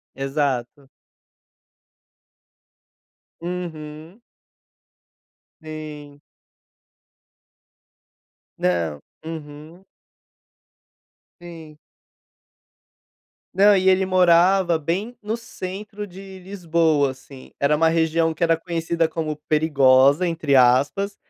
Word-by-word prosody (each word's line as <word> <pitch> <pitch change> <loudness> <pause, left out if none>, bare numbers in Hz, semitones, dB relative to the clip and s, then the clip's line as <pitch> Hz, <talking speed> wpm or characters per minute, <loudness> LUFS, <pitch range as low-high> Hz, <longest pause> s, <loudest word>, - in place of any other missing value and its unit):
Exato. 135 -1 -3 2.5
Uhum. 165 0 -7 1.4
Sim. 150 -2 -9 2.4
Não, 85 -4 -1 0.3
uhum. 160 +2 -10 1.6
Sim. 165 -3 -12 1.8
Não, 200 +2 +5
e 190 0 +2
ele 190 0 +4
morava 180 -1 +3
bem 190 +10 -3
no 215 +2 -3
centro 210 -2 -8
de 190 +1 -12
Lisboa, 165 -6 0
assim, 130 0 -15
era 140 +2 +2
uma 165 +2 +3
região 165 0 +1
que 170 - -1
era 165 -1 +3
conhecida 165 0 -2
como 160 -2 -4
"perigosa", 145 0 +4
entre 160 -4 -1
aspas, 135 +11 +3
165 Hz, 75 wpm, -22 LUFS, 145-180 Hz, 2.5 s, Não